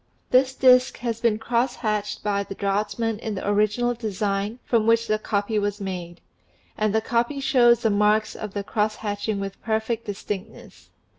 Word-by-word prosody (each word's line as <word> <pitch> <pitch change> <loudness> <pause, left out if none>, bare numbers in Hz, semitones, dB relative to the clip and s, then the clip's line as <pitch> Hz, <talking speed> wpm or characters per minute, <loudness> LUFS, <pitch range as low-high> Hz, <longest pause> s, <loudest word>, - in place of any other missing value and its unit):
This 260 +1 +4
disk 255 -1 +5
has 230 -2 -3
been 230 -3 +2
cross 240 +3 0
hatched 210 -3 -2
by 205 -1 0
the 195 0 -7
draughtsman 210 +3 -1
in 220 -2 -4
the 190 - -5
original 215 +4 +2
design 210 -1 -2
from 225 -2 +1
which 230 0 +4
the 215 -1 0
copy 210 0 -1
was 205 0 -2
made; 180 -3 -6 0.5
and 215 -1 0
the 220 +1 +1
copy 235 +5 0
shows 245 -3 +4
the 220 - +3
marks 210 +1 +2
of 210 -2 -7
the 200 - -2
cross 210 +1 0
hatching 205 0 -3
with 195 0 -6
perfect 220 +1 -1
distinctness. 205 +1 -7
215 Hz, 170 wpm, -24 LUFS, 205-235 Hz, 0.5 s, disk